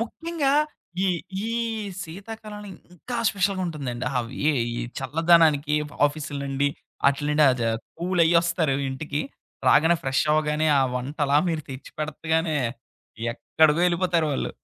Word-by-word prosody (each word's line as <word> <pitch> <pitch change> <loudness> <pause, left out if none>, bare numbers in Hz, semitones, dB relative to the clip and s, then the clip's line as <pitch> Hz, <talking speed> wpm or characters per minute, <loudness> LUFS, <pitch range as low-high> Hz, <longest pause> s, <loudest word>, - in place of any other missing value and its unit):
ముఖ్యంగా 310 +3 -1 0.5
ఈ - - +3 0.4
ఈ - - -2 0.5
శీతాకాలంలో 210 +4 -9 0.3
ఇంకా 240 +8 -6
స్పెషల్‌గా 195 -1 0
ఉంటుందండి. 135 -7 -4
అవి 120 +2 -5
ఎ - - +1 0.2
ఈ - - -2 0.2
చల్లదనానికి 155 +1 +3
ఎ - - -4 0.2
ఆఫీస్‌ల 145 -1 -5
నుండి 140 +1 +1 0.4
ఆటిల 140 +1 +2
నుండి 150 0 +4
అద 125 -2 -3 0.4
కూల్ 180 +1 0
అయ్యొస్తారు 170 -3 +2
ఇంటికి. 145 +2 -3 0.5
రాగానే 160 +5 +5
ఫ్రెష్ 135 +2 +1
అవ్వగానే 155 0 +1
ఆ - - +4
వంట 130 +4 -4
అలా 140 +1 +3
మీరు 160 -2 -1
తెచ్చిపెడతగానే, 155 +3 -2 0.8
ఎక్కడికో 155 +6 +2
ఎళ్ళిపోతారు 175 -2 +1
వొళ్ళు. - - -2
155 Hz, 125 wpm, -25 LUFS, 145-175 Hz, 0.8 s, రాగానే